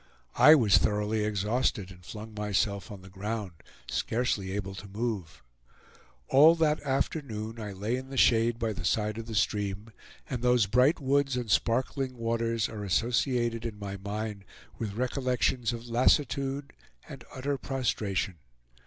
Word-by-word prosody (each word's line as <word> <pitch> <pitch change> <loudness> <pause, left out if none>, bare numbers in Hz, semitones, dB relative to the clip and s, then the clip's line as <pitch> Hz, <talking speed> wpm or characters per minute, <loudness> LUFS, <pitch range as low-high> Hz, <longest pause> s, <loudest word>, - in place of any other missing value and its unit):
I 155 - +9
was 110 -9 +5
thoroughly 105 +1 0
exhausted, 105 -1 0
and 90 -1 -15
flung 110 +3 -9
myself 105 -1 -1
on 100 -3 -9
the 95 - -12
ground, 105 +1 -4 0.4
scarcely 110 -5 -1
able 100 -1 -4
to 95 +1 -9
move. 95 - -4 0.8
All 155 +5 +7
that 155 -2 +1
afternoon 120 -5 -2
I 105 -2 -5
lay 105 +6 -2
in 130 +1 -8
the 135 - -6
shade 115 -1 +4
by 115 -2 -1
the 80 - -7
side 105 +3 0
of 115 - -7
the 115 - -5
stream, 105 0 -1 0.4
and 125 -3 -4
those 125 -3 +4
bright 125 - +3
woods 135 -1 +1
and 120 -4 -3
sparkling 130 +3 0
waters 115 -1 0
are 105 -2 -7
associated 120 +3 0
in 115 -3 -5
my 100 -1 -5
mind 105 +1 -5 0.4
with 105 -3 -4
recollections 125 -1 0
of 120 0 -7
lassitude 135 +3 +1 0.3
and - - -10
utter 135 +1 -2
prostration. 105 - -2
115 Hz, 150 wpm, -29 LUFS, 105-125 Hz, 0.8 s, I